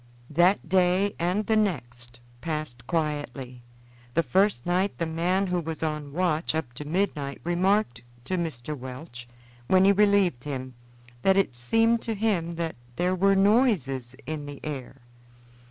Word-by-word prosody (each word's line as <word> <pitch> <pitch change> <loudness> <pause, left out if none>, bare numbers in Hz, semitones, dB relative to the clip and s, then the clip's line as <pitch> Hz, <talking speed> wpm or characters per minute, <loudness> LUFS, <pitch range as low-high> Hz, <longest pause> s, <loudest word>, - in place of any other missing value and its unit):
That 175 +4 +3
day 185 +3 +3
and 180 +5 0
the 220 - +2
next 120 - -2 0.2
passed 150 -7 -4
quietly. 145 -6 -3 0.5
The 165 - +3
first 185 - +2
night 185 +3 0
the 170 - -1
man 175 +4 0
who 180 -1 0
was 160 -1 -5
on 150 -2 -3
watch 165 -1 0
up 135 -7 -3
to 145 +4 -8
midnight 150 -4 -1
remarked 175 - +1 0.2
to 185 - -1
Mr. 155 -5 -3
Welch, 130 -1 -9 0.4
when 185 0 +5
he 200 - +7
relieved 200 -9 +3
him, 130 -3 -5 0.5
that 190 +5 +4
it 195 -11 +1
seemed 225 - +2
to 225 - -3
him 190 -6 0
that 165 -3 -3 0.2
there 180 +4 +1
were 195 +2 +3
noises 195 - +2
in 150 -2 -5
the 145 -1 -8
air. 135 -3 -6
165 Hz, 150 wpm, -26 LUFS, 140-190 Hz, 0.5 s, he